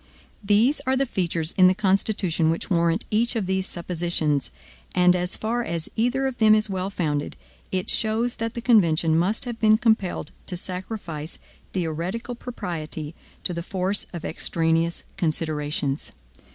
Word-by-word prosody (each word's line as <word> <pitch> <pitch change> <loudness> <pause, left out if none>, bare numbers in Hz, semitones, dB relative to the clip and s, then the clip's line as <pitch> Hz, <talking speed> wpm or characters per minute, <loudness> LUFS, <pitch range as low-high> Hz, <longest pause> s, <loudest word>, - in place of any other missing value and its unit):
There 210 +7 +4
are 260 0 +3
features 170 -7 -1
in 185 - +9
the 185 - +4
Constitution 190 -4 +1
which 165 +4 -2
warrant 170 -1 +2
each 235 +3 +2
of 220 -4 0
these 190 0 0
suppositions; 170 -5 -1 0.5
and 180 0 +5
as 180 0 -1
far 235 +2 -1
as 165 -5 -3
either 245 +4 +1
of 265 -2 -3
them 215 -1 +7
is 215 -1 +2
well 190 0 -2
founded, 150 -7 -2 0.4
it 185 -1 -1
shows 225 +2 +1
that 230 0 -3
the 235 - -3
convention 170 -9 +4
must 190 +10 +1
have 240 -2 -5
been 215 -1 +5
compelled 220 -5 +1 0.2
to 180 - -2
sacrifice 180 -4 -4 0.4
theoretical 180 +7 -3
propriety 165 -10 -5 0.3
to 180 - -1
the 170 - -3
force 190 +2 0
of 170 -3 -6
extraneous 165 0 0
considerations. 150 -4 -1
185 Hz, 150 wpm, -24 LUFS, 165-220 Hz, 0.5 s, in